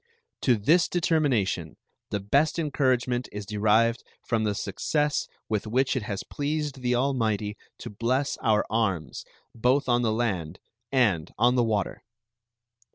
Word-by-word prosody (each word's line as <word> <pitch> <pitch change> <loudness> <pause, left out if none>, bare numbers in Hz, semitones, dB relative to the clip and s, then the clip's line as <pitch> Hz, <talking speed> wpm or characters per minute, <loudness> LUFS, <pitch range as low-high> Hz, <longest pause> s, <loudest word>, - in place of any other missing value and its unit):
To 125 - +4
this 150 - +3
determination 130 - 0 0.3
the 105 - -1
best 140 - +2
encouragement 130 -5 0
is 105 0 -6
derived 110 +3 +2 0.2
from 115 -2 0
the 105 -1 0
success 150 +7 -1 0.2
with 110 0 -2
which 130 +5 +1
it 130 - 0
has 105 -3 -4
pleased 145 -2 -3
the 125 0 +1
Almighty 110 -6 0 0.2
to - - -8
bless 130 +6 0
our 110 -3 +2
arms 95 -8 -1 0.3
both 125 +5 +1
on 120 -1 +3
the 115 -2 +1
land 95 -8 -2 0.3
and 105 - +2
on 120 +1 +4
the 125 -1 +3
water. 110 -3 -1
120 Hz, 140 wpm, -26 LUFS, 105-135 Hz, 0.3 s, To